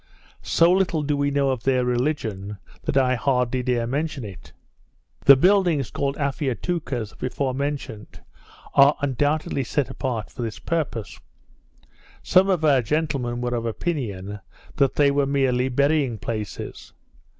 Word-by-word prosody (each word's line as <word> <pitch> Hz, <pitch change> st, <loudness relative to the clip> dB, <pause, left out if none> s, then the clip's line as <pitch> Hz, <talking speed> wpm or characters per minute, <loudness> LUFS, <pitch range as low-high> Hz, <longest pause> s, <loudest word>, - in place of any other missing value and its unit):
So 170 Hz, +1 st, +3 dB
little 185 Hz, -4 st, +1 dB
do 145 Hz, 0 st, 0 dB
we 145 Hz, 0 st, +1 dB
know 140 Hz, -1 st, +1 dB
of 130 Hz, -3 st, -3 dB
their 130 Hz, -1 st, +1 dB
religion, 120 Hz, -6 st, -2 dB, 0.3 s
that -, -, 0 dB
I 130 Hz, -1 st, +3 dB
hardly 125 Hz, 0 st, 0 dB
dare 125 Hz, -2 st, 0 dB
mention 145 Hz, +2 st, -2 dB
it. 100 Hz, -3 st, -11 dB, 0.7 s
The 140 Hz, -, +10 dB
buildings 175 Hz, -, +3 dB
called 140 Hz, 0 st, -2 dB
Afiatoucas, 140 Hz, -, -2 dB
before 130 Hz, +1 st, -2 dB
mentioned, 140 Hz, -6 st, -5 dB, 0.5 s
are 140 Hz, +2 st, +6 dB
undoubtedly 145 Hz, +1 st, 0 dB
set 135 Hz, +2 st, -1 dB
apart 120 Hz, -6 st, -4 dB
for 130 Hz, -, -7 dB
this 115 Hz, -2 st, -4 dB
purpose. 140 Hz, -10 st, -3 dB, 1.0 s
Some 185 Hz, +2 st, +4 dB
of 175 Hz, -5 st, +1 dB
our 140 Hz, -4 st, +5 dB
gentlemen 135 Hz, -3 st, -1 dB
were 125 Hz, 0 st, -2 dB
of 115 Hz, -1 st, -2 dB
opinion, 105 Hz, -, -3 dB, 0.4 s
that 135 Hz, -2 st, +2 dB
they 145 Hz, -1 st, +4 dB
were 140 Hz, 0 st, +1 dB
merely 130 Hz, -2 st, +1 dB
burying 140 Hz, -2 st, +1 dB
places. 105 Hz, 0 st, -6 dB
135 Hz, 140 wpm, -23 LUFS, 120-145 Hz, 1.0 s, The